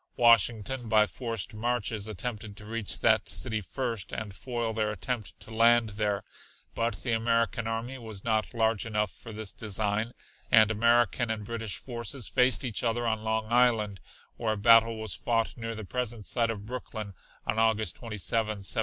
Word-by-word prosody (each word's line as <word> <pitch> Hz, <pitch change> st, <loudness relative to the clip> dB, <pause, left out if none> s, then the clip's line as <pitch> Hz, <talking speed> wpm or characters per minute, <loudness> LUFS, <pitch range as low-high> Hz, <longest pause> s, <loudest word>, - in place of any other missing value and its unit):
Washington 115 Hz, +1 st, +3 dB
by 110 Hz, -1 st, +5 dB
forced 115 Hz, -3 st, -4 dB
marches 110 Hz, -2 st, -1 dB
attempted 105 Hz, 0 st, -5 dB
to 105 Hz, -, -9 dB
reach 110 Hz, -1 st, -2 dB
that -, -, +4 dB
city 110 Hz, -4 st, -1 dB
first 115 Hz, -1 st, -3 dB
and 105 Hz, -3 st, -5 dB
foil 120 Hz, 0 st, -3 dB
their 110 Hz, -1 st, 0 dB
attempt 105 Hz, -3 st, -4 dB
to -, -, -12 dB
land 115 Hz, 0 st, +5 dB
there, 105 Hz, -1 st, -1 dB, 0.5 s
but 115 Hz, -3 st, -2 dB
the 120 Hz, -, -1 dB
American 115 Hz, 0 st, +1 dB
army 115 Hz, +4 st, -3 dB
was 110 Hz, -4 st, -7 dB
not 110 Hz, +1 st, 0 dB
large 110 Hz, -2 st, +2 dB
enough 105 Hz, -2 st, 0 dB
for 115 Hz, -, -11 dB
this 110 Hz, -2 st, -5 dB
design, 110 Hz, +2 st, -1 dB, 0.4 s
and 110 Hz, -1 st, +6 dB
American 120 Hz, +1 st, +3 dB
and 110 Hz, -2 st, -3 dB
British 115 Hz, -2 st, -4 dB
forces 120 Hz, 0 st, -5 dB
faced 125 Hz, +1 st, +3 dB
each 120 Hz, -2 st, -1 dB
other 120 Hz, 0 st, 0 dB
on 110 Hz, -1 st, 0 dB
Long 110 Hz, 0 st, 0 dB
Island 115 Hz, -5 st, +3 dB, 0.4 s
where 110 Hz, -2 st, 0 dB
a -, -, -4 dB
battle 115 Hz, +1 st, +6 dB
was 110 Hz, -3 st, -3 dB
fought 115 Hz, -1 st, 0 dB
near 115 Hz, -1 st, -5 dB
the 110 Hz, -1 st, -7 dB
present 120 Hz, -1 st, -3 dB
site 115 Hz, -2 st, +1 dB
of 105 Hz, -3 st, -4 dB
Brooklyn 110 Hz, -4 st, -6 dB, 0.3 s
on 110 Hz, -, 0 dB
August 110 Hz, -5 st, +2 dB
27th, 115 Hz, -3 st, -7 dB
1776. 110 Hz, -3 st, 0 dB
110 Hz, 170 wpm, -29 LUFS, 105-120 Hz, 0.5 s, and